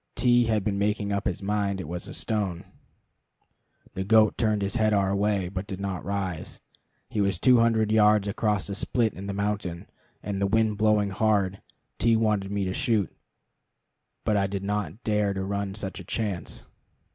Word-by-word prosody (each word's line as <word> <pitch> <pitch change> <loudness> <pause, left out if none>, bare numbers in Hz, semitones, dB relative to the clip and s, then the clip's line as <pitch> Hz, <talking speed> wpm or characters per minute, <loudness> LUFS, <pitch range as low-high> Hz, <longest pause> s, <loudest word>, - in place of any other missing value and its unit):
T 120 0 +4
had 110 -3 +1
been 100 0 -1
making 105 0 0
up 100 - -1
his 90 +2 -3
mind 100 -1 0
it 95 - -5
was 85 +2 -5
a - - -8
stone. 100 -5 -2 1.3
The 95 - -3
goat 110 +1 +4
turned 105 -3 +1
his 100 +5 -1
head 110 -2 +3
our 100 -1 +2
way, 100 -2 +1
but 95 +2 -5
did 95 -2 -6
not 100 -2 -3
rise. 95 -5 -4 0.5
He 105 - -1
was 100 -3 +1
two 125 +5 +5
hundred 110 -2 +2
yards 105 -1 +4
across 105 -1 0
a 100 - -3
split 110 +2 0
in 100 +1 -8
the - - -2
mountain, 100 -4 -2 0.4
and 100 -1 -3
the 100 - +2
wind 110 0 +1
blowing 105 -2 +3
hard. 100 -2 +1 0.4
T 115 0 +4
wanted 105 -3 +1
me 100 -1 -1
to 95 - -2
shoot, 110 - 0 1.1
but 105 - +1
I 100 -1 +2
did 100 0 -4
not 105 +1 -3
dare 105 -2 +1
to 95 - -2
run 100 0 -3
such 100 -3 -5
a - - -8
chance. 105 -6 -3
100 Hz, 185 wpm, -26 LUFS, 95-110 Hz, 1.3 s, two